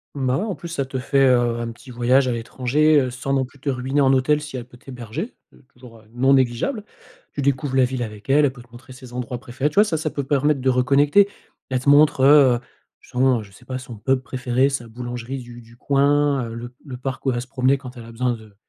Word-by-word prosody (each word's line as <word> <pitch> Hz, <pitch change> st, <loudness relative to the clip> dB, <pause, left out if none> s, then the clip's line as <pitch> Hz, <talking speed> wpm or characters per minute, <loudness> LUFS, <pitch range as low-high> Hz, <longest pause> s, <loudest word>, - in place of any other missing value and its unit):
Bah, 130 Hz, -2 st, 0 dB
ouais. 200 Hz, -, -2 dB
En 205 Hz, -4 st, -3 dB
plus 170 Hz, -, -9 dB
ça 140 Hz, -5 st, -2 dB
te 130 Hz, 0 st, -5 dB
fait, 135 Hz, +1 st, +2 dB
heu, 120 Hz, -2 st, +2 dB
un 115 Hz, 0 st, -4 dB
petit 125 Hz, +3 st, -14 dB
voyage 125 Hz, +3 st, +2 dB
à 125 Hz, -, +1 dB
l'étranger, 135 Hz, +6 st, +2 dB
heu, 130 Hz, -1 st, -2 dB
sans 135 Hz, +2 st, -3 dB
non 135 Hz, -1 st, +1 dB
plus 135 Hz, +2 st, -19 dB
te 140 Hz, -, -3 dB
ruiner 135 Hz, +2 st, 0 dB
en 135 Hz, -1 st, +4 dB
hôtel 150 Hz, +3 st, +2 dB
si 150 Hz, -3 st, -7 dB
elle 120 Hz, -, -6 dB
peut 120 Hz, 0 st, -17 dB
t'héberger. 130 Hz, -, -7 dB, 0.2 s
C'est 130 Hz, -, -23 dB
toujours, 120 Hz, -4 st, -16 dB
heu, -, -, -21 dB
non 130 Hz, +3 st, +3 dB
négligeable. 130 Hz, -, +1 dB, 0.5 s
Tu 145 Hz, -, -3 dB
découvres 135 Hz, 0 st, 0 dB
la 130 Hz, -, +5 dB
ville 125 Hz, 0 st, -4 dB
avec 105 Hz, +1 st, -9 dB
elle, 145 Hz, +2 st, +5 dB
elle 140 Hz, -, +1 dB
peut 125 Hz, -, -13 dB
te 120 Hz, -, -26 dB
montrer 125 Hz, +2 st, -13 dB
ses 130 Hz, -2 st, -13 dB
endroits 125 Hz, 0 st, -4 dB
préférés, 130 Hz, +4 st, -2 dB
tu 150 Hz, -, -16 dB
vois? 205 Hz, -, +7 dB
Ça, 175 Hz, -7 st, -1 dB
ça 155 Hz, 0 st, -2 dB
peut 140 Hz, -1 st, -4 dB
permettre 140 Hz, 0 st, +1 dB
de 130 Hz, -, +2 dB
reconnecter. 140 Hz, +10 st, +4 dB, 0.4 s
Elle 130 Hz, -1 st, 0 dB
te 135 Hz, -, 0 dB
montre, 145 Hz, -1 st, +5 dB
heu, 135 Hz, -3 st, +6 dB, 0.4 s
justement 125 Hz, -3 st, +1 dB
je 100 Hz, -, -16 dB
sais 115 Hz, +5 st, -18 dB
pas, 130 Hz, 0 st, -4 dB
son 120 Hz, -3 st, -9 dB
pub 130 Hz, +5 st, +1 dB
préféré, 130 Hz, +1 st, 0 dB
sa 130 Hz, -4 st, -4 dB
boulangerie 120 Hz, +2 st, -6 dB
du 120 Hz, -1 st, -11 dB
du 115 Hz, +1 st, -18 dB
coin, 140 Hz, 0 st, +2 dB
heu, 115 Hz, -, -7 dB
le 120 Hz, +1 st, -8 dB
le 130 Hz, -3 st, -7 dB
parc 130 Hz, +1 st, -5 dB
où 135 Hz, -, +3 dB
elle 125 Hz, -, 0 dB
va 120 Hz, -, -2 dB
se 125 Hz, -, -9 dB
promener 130 Hz, +1 st, +1 dB
quand 130 Hz, -1 st, -11 dB
elle 115 Hz, -, -9 dB
a 115 Hz, -, -11 dB
besoin 125 Hz, +1 st, -1 dB
de 110 Hz, -3 st, -12 dB
130 Hz, 260 wpm, -22 LUFS, 120-140 Hz, 0.5 s, vois